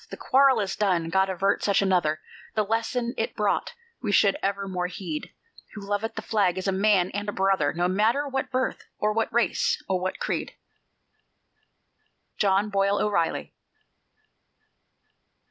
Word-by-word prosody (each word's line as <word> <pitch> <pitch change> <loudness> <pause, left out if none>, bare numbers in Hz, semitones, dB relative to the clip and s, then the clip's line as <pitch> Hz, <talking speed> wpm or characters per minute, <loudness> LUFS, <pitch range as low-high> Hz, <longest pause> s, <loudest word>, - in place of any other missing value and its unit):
The - - -8
quarrel 265 -2 +4
is 195 -2 -2
done 180 -5 +1
God 190 +1 +2
avert 195 +2 0
such 200 -2 +3
another; 175 -6 +1 0.3
The 215 - +2
lesson 235 +2 -1
it - - -2
brought - - -1 0.3
we 215 - -1
should 200 -1 +4
evermore 195 -2 -2
heed: 175 -4 -6 0.4
Who 210 - -7
loveth 205 +2 -2
the - - -5
Flag 195 -5 +1
is 185 - -3
a - - +2
man 190 -2 +2
and 205 +1 -3
a - - -1
brother, 190 -7 +1
No 175 +1 0
matter 220 +10 +1
what 265 -1 -2
birth 260 0 -2
or 210 0 0
what 225 +1 0
race 235 0 +1
or 185 -1 0
what 185 +1 -3
creed. - - -3 1.8
JOHN 200 +1 +2
BOYLE 200 +1 +2
O'REILLY. 200 -6 0
200 Hz, 150 wpm, -26 LUFS, 185-215 Hz, 1.8 s, quarrel